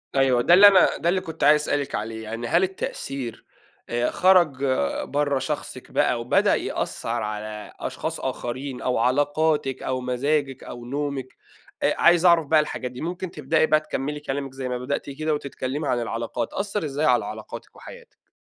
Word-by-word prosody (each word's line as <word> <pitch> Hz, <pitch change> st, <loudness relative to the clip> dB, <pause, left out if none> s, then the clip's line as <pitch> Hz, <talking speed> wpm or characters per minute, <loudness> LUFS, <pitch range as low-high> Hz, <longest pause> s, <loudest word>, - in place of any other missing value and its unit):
أيوه 130 Hz, -3 st, +3 dB
ده 170 Hz, -, +4 dB
اللي 200 Hz, +3 st, +10 dB
أنا 195 Hz, -2 st, +5 dB
ده 170 Hz, -, 0 dB
اللي 185 Hz, +1 st, +1 dB
كنت 160 Hz, -2 st, -6 dB
عايز 150 Hz, +1 st, +6 dB
أسألِك 145 Hz, -2 st, -1 dB
عليه، 110 Hz, +1 st, -4 dB
يعني 115 Hz, +2 st, -5 dB
هل 170 Hz, +7 st, +3 dB
التأثير، 135 Hz, -10 st, -4 dB, 0.4 s
آآ 120 Hz, +1 st, 0 dB
خرج 175 Hz, -8 st, +4 dB, 0.4 s
برا 145 Hz, -1 st, 0 dB
شخصِك -, -, -5 dB
بقى 120 Hz, -, +1 dB
وبدأ 120 Hz, -, +3 dB
يأثر 115 Hz, 0 st, -3 dB
على 105 Hz, 0 st, -6 dB
أشخاص -, -, -4 dB
آخرين 130 Hz, +2 st, -4 dB
أو 125 Hz, -, 0 dB
علاقاتِك 145 Hz, +3 st, +1 dB
أو 130 Hz, -1 st, -2 dB
مزاجِك 135 Hz, +2 st, -1 dB
أو 120 Hz, 0 st, -9 dB
نومِك؟ 140 Hz, 0 st, -3 dB, 0.6 s
أ -, -, +3 dB
عايز 175 Hz, +1 st, +5 dB
أعرف 170 Hz, -3 st, +6 dB
بقى 155 Hz, +1 st, +5 dB
الحاجات 130 Hz, -4 st, -3 dB
دي، 125 Hz, -, -9 dB
ممكن 175 Hz, +2 st, -4 dB
تبدئي 155 Hz, 0 st, +1 dB
بقى 155 Hz, 0 st, +4 dB
تكملي 150 Hz, -1 st, -4 dB
كلامِك 140 Hz, -2 st, -4 dB
زي 130 Hz, -1 st, -5 dB
ما 125 Hz, -, -2 dB
بدأتِ 130 Hz, +3 st, -3 dB
كده 155 Hz, +3 st, -2 dB
وتتكلمي 140 Hz, 0 st, -4 dB
عن 125 Hz, -1 st, +1 dB
العلاقات، 115 Hz, 0 st, -3 dB
أثر 200 Hz, -2 st, -2 dB
إزاي 145 Hz, +1 st, -1 dB
على -, -, +3 dB
علاقاتِك -, -, -8 dB
وحياتِك؟ 485 Hz, -1 st, -14 dB
140 Hz, 170 wpm, -24 LUFS, 125-155 Hz, 0.6 s, اللي